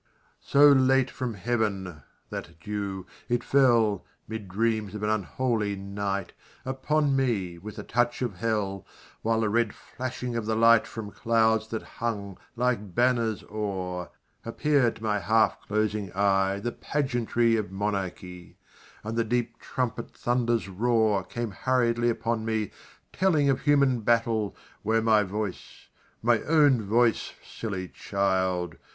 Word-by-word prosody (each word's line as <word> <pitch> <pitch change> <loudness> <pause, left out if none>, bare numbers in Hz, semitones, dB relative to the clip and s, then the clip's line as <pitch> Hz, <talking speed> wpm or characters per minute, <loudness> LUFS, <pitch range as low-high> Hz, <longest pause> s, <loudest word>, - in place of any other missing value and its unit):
So 145 +1 +6
late 135 -1 +4
from 125 -4 -4
Heaven 100 -6 -2 0.3
that - - -7
dew 100 -2 -4 0.2
it 120 0 +1
fell 115 -8 +3 0.2
(Mid 110 -2 -6
dreams 110 +1 -1
of 105 - -5
an 105 - +1
unholy 110 0 -1
night) 100 -1 -3 0.3
Upon 140 +2 +1
me 100 -10 0
with 105 +4 -8
the - - -6
touch 120 +1 0
of 110 -7 -3
Hell, 100 -3 -1 0.4
While 115 0 +1
the 110 - +1
red 115 0 +1
flashing 125 -1 -5
of 115 -2 -2
the 110 - +1
light 115 0 +5
From 110 -3 -7
clouds 110 -1 +2
that 110 0 -4
hung, 100 -5 -4 0.2
like 120 -6 -1
banners, 120 -3 +2
o'er, 95 -4 -4 0.3
Appeared 135 +1 +1
to - - -13
my 105 -1 +1
half 110 +4 +2
closing 105 -2 -1
eye 95 0 +2
The 120 +4 -2
pageantry 120 -5 0
of 105 -4 -2
monarchy, 95 -3 -4 0.5
And 110 +1 -4
the 115 - +2
deep 120 +1 -2
trumpet 120 -2 -3
thunder's 120 -4 0
roar 110 0 +2
Came 115 +3 -4
hurriedly 120 +1 +1
upon 115 0 -1
me, 110 -2 -1 0.4
telling 155 -7 +3
Of 130 - -1
human 140 -4 +3
battle, 115 -2 +1 0.3
where 110 +1 +1
my 110 -2 +5
voice, 105 0 -5 0.3
My 120 -1 +3
own 145 -6 +4
voice, 115 +3 +1
silly 95 -5 -5
child! 95 -3 -1
110 Hz, 140 wpm, -27 LUFS, 100-120 Hz, 0.5 s, So